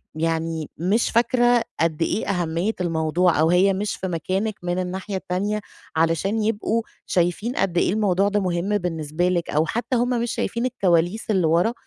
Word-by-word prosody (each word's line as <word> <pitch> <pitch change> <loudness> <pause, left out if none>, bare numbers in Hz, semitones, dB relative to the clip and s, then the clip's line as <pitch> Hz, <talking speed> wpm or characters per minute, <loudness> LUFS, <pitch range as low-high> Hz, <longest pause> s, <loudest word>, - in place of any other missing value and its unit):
يعني 160 -1 -2
مش 195 +8 +1
فاكرة 240 +1 +3 0.2
قد 165 -1 0
إيه 205 - 0
أهمية 175 +1 0
الموضوع 165 0 +1
أو 160 +1 +4
هي 185 +3 +4
مش 200 +2 -2
في 190 - -4
مكانِك 185 +5 -2
من 175 +1 -1
الناحية 185 +2 -4
التانية 190 +3 -2 0.4
علشان 165 +7 +1
يبقوا 225 +1 0 0.2
شايفين 180 +8 0
قد 175 -2 0
إيه 180 - +2
الموضوع 200 -2 +2
ده 205 0 +1
مهم 185 +2 0
بالنسبة 165 -1 -1
لِك، 175 -2 -1
أو 155 +2 +2
حتى 235 +8 -2
هُم 245 +1 +1
مش 240 - -1
شايفين 235 +2 -2
الكواليس 190 -4 +1
اللي 190 -6 +2
ورا 175 +8 +2
185 Hz, 165 wpm, -23 LUFS, 165-210 Hz, 0.4 s, أو